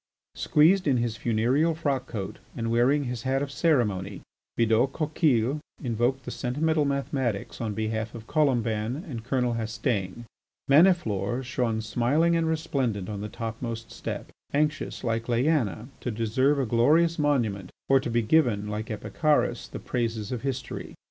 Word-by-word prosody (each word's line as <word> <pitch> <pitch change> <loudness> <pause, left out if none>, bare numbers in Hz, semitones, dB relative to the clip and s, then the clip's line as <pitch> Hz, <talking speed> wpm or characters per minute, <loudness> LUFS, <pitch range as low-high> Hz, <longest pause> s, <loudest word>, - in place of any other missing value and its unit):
Squeezed 175 +4 +3
in 135 -3 +3
his 120 -2 -1
funereal 125 +9 +1
frock 140 -5 -1
coat 100 -5 -5 0.2
and 115 -1 -2
wearing 130 +5 +3
his 125 -3 -4
hat 135 +2 0
of 140 - -5
ceremony, 120 - 0 0.4
Bidault 115 +3 +3
Coquille 150 -4 +1 0.2
invoked 125 +2 0
the - - -5
sentimental 150 +4 0
mathematics 135 -7 -2
on 110 -3 -2
behalf 110 +1 -2
of 115 -1 -9
Colomban 120 -2 0
and 120 -7 -6
Colonel 125 -1 0
Hastaing. 115 -2 -2 0.4
Maniflore 135 - +3
shone 120 -3 -1
smiling 130 +10 +2
and 165 -1 +1
resplendent 135 - -1
on 105 -1 -4
the 105 - -4
topmost 115 +1 -5
step, - - -6 0.2
anxious, 150 +1 -1
like 115 -1 -1
Leaena, 120 -3 +1
to - - -4
deserve 120 +6 +1
a 135 - +1
glorious 155 +9 +3
monument, 115 -11 0 0.2
or 135 0 +5
to 130 - -4
be 115 0 +1
given, 110 -5 +2
like 105 +2 -4
Epicharis, 150 +7 0
the - - -6
praises 115 -4 -2
of 125 -3 -3
history. 135 -1 -4
120 Hz, 150 wpm, -27 LUFS, 110-145 Hz, 0.4 s, or